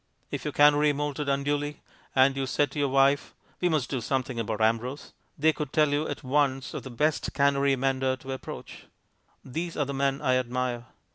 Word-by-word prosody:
If -, -, -4 dB
your -, -, -1 dB
canary 145 Hz, 0 st, +5 dB
moulted 145 Hz, 0 st, -2 dB
unduly, 145 Hz, +1 st, -1 dB, 0.3 s
and 135 Hz, +1 st, +5 dB
you 135 Hz, -1 st, -2 dB
said 145 Hz, +2 st, +1 dB
to 150 Hz, -, -5 dB
your 145 Hz, -, +2 dB
wife, 135 Hz, +1 st, +2 dB, 0.2 s
"We 180 Hz, -, +2 dB
must 155 Hz, -6 st, +1 dB
do 130 Hz, -3 st, -1 dB
something 130 Hz, 0 st, -2 dB
about 110 Hz, -1 st, -2 dB
Ambrose," 115 Hz, +5 st, -1 dB, 0.2 s
they 155 Hz, +2 st, +3 dB
could 150 Hz, -3 st, -5 dB
tell 150 Hz, -1 st, +3 dB
you 145 Hz, +2 st, 0 dB
at -, -, -5 dB
once 135 Hz, 0 st, 0 dB
of -, -, -4 dB
the 130 Hz, -, -9 dB
best 150 Hz, +6 st, 0 dB
canary 140 Hz, -1 st, +3 dB
mender 130 Hz, 0 st, 0 dB
to 135 Hz, +1 st, -9 dB
approach. 130 Hz, -, -8 dB, 0.6 s
These 165 Hz, +6 st, -4 dB
are 145 Hz, -, +1 dB
the 140 Hz, -, -4 dB
men 135 Hz, 0 st, 0 dB
I 130 Hz, -2 st, +2 dB
admire. 125 Hz, -1 st, -2 dB
140 Hz, 195 wpm, -27 LUFS, 130-145 Hz, 0.6 s, canary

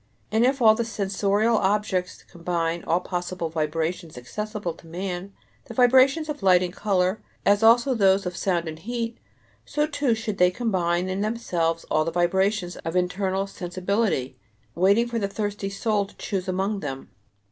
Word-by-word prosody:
And 220 Hz, +2 st, +3 dB
if 260 Hz, 0 st, +2 dB
all 220 Hz, -1 st, +8 dB
the 235 Hz, -, -1 dB
sensorial 205 Hz, +1 st, +1 dB
objects 190 Hz, -2 st, 0 dB
combine 170 Hz, -1 st, -3 dB
all 170 Hz, +2 st, +1 dB
possible 180 Hz, -2 st, -4 dB
vibrations 160 Hz, 0 st, -2 dB
accessible 210 Hz, -, -4 dB
to 165 Hz, -, -17 dB
man 180 Hz, +2 st, -5 dB, 0.3 s
the 230 Hz, -, -10 dB
vibrations 260 Hz, +5 st, +5 dB
of 295 Hz, -2 st, -5 dB
light 185 Hz, -2 st, +5 dB
and 180 Hz, -1 st, -4 dB
color, 190 Hz, -1 st, 0 dB, 0.2 s
as 205 Hz, +1 st, +4 dB
also 235 Hz, +4 st, +5 dB
those 195 Hz, -4 st, +3 dB
of 180 Hz, -1 st, -3 dB
sound 175 Hz, -3 st, 0 dB
and 155 Hz, 0 st, -6 dB
heat, 230 Hz, +3 st, -4 dB, 0.4 s
so 295 Hz, 0 st, 0 dB
too 285 Hz, -5 st, 0 dB
should 220 Hz, -2 st, -4 dB
they 180 Hz, 0 st, +6 dB
combine 180 Hz, -4 st, 0 dB
in 190 Hz, +1 st, -2 dB
themselves 175 Hz, -7 st, -1 dB
all 155 Hz, -, +3 dB
the 165 Hz, -, -2 dB
vibrations 180 Hz, +2 st, +1 dB
of 165 Hz, +2 st, -5 dB
internal 190 Hz, +2 st, 0 dB
sensibility, 185 Hz, -, -2 dB, 0.3 s
waiting 200 Hz, -, +3 dB
for 235 Hz, -1 st, -2 dB
the 200 Hz, -, 0 dB
thirsty 205 Hz, -1 st, -3 dB
soul 205 Hz, 0 st, 0 dB
to -, -, -19 dB
choose 190 Hz, -2 st, -3 dB
among 195 Hz, +3 st, -1 dB
them. 135 Hz, -5 st, -6 dB
195 Hz, 165 wpm, -25 LUFS, 175-220 Hz, 0.4 s, all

